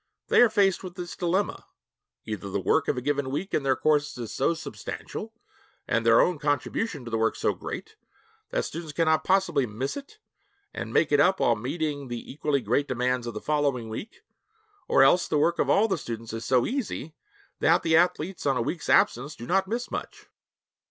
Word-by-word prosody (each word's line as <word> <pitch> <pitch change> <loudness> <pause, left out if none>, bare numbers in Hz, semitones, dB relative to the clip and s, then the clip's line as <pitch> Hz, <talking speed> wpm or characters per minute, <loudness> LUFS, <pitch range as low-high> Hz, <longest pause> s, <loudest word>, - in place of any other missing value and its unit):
They - - +6
are 240 - +7
faced 200 -4 +2
with 180 -1 -8
this 180 -1 -6
dilemma. 185 +2 -1 0.6
Either 105 -2 -5
the 100 - -1
work 155 - +1
of 140 - 0
a - - -1
given 140 0 -1
week 150 +9 -4
in - - +2
their 135 -1 +2
courses 150 -1 +1
is 120 -3 -6
so 170 - +1
substantial, 160 - -7 0.6
and 115 - +1
their 115 0 +6
own 175 -4 +1
contribution 145 - -1
to 120 - -7
the 115 - 0
work 115 0 +1
so - - 0
great, - - -7 0.5
that - - -1
students 160 -2 -6
cannot 160 -1 +2
possibly 180 -9 +2
miss 115 +6 -4
it, 285 +10 -9 0.6
and - - -5
'make 155 - +2
it 145 - +4
up' 185 +6 +4
while 120 - +3
meeting 145 +4 -3
the 120 -1 -6
equally 145 -1 0
great 125 +6 0
demands 125 -1 -1
of 120 - -5
the - - -3
following 140 -6 0
week, 155 - -8 0.6
or - - +5
else 175 +6 +4
the 155 - +1
work 170 +4 +2
of - - +1
all 215 +3 +4
the 200 - -1
students 115 -1 -6
is 115 0 -4
so 125 -2 +3
easy 220 - -3 0.5
that - - +3
the 160 -1 +3
athletes 175 0 +1
on 135 -2 +2
a - - +1
week's 165 +7 -4
absence 135 +6 +3
do 120 - -9
not 190 +6 +1
miss 235 +4 -3
much. - - -6
145 Hz, 200 wpm, -26 LUFS, 125-175 Hz, 0.6 s, are